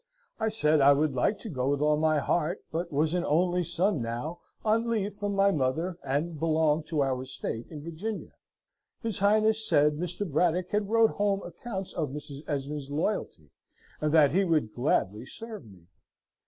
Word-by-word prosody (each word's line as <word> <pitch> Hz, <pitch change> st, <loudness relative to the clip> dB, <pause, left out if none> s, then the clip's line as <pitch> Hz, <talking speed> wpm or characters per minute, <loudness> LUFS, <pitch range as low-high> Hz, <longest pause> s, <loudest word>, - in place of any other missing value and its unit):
I 220 Hz, 0 st, +1 dB
said, 155 Hz, -8 st, +3 dB
I 140 Hz, +1 st, +7 dB
would 145 Hz, 0 st, +1 dB
like 195 Hz, -, +1 dB
to -, -, -7 dB
go 130 Hz, -5 st, -1 dB
with 140 Hz, 0 st, +1 dB
all 150 Hz, +1 st, +3 dB
my 155 Hz, 0 st, +2 dB
heart, 165 Hz, +4 st, 0 dB
but 170 Hz, +2 st, -3 dB
was 155 Hz, +3 st, +1 dB
an 180 Hz, -1 st, 0 dB
only 180 Hz, +3 st, +2 dB
son 180 Hz, -, 0 dB
now, 120 Hz, +9 st, -4 dB, 0.3 s
on 225 Hz, +2 st, +2 dB
leave 210 Hz, -3 st, -1 dB
from 205 Hz, 0 st, -3 dB
my 195 Hz, 0 st, +4 dB
mother, 165 Hz, +5 st, -1 dB
and 145 Hz, +4 st, -2 dB
belonged 160 Hz, -1 st, +1 dB
to 155 Hz, -3 st, 0 dB
our 130 Hz, -2 st, -1 dB
estate 130 Hz, -3 st, -5 dB
in 150 Hz, -2 st, -8 dB
Virginia. 180 Hz, +7 st, -5 dB, 0.7 s
His 225 Hz, -4 st, -1 dB
Royal 200 Hz, -, +5 dB
Highness 220 Hz, +1 st, +3 dB
said, 150 Hz, +1 st, +4 dB
Mr. 180 Hz, +3 st, -2 dB
Braddock 175 Hz, +3 st, +1 dB
had 205 Hz, -1 st, -1 dB
wrote 225 Hz, 0 st, +4 dB
home 200 Hz, -1 st, 0 dB
accounts 190 Hz, +2 st, -6 dB
of 155 Hz, -4 st, -2 dB
Mrs. 145 Hz, 0 st, -7 dB
Esmond's 145 Hz, -1 st, -3 dB
loyalty, 145 Hz, -, -3 dB, 0.5 s
and 150 Hz, 0 st, +1 dB
that 150 Hz, -3 st, +5 dB
he 190 Hz, +6 st, +3 dB
would 155 Hz, -, +1 dB
gladly 110 Hz, -5 st, 0 dB
serve 220 Hz, -, -8 dB
me. 95 Hz, -5 st, -16 dB
160 Hz, 180 wpm, -28 LUFS, 145-195 Hz, 0.7 s, I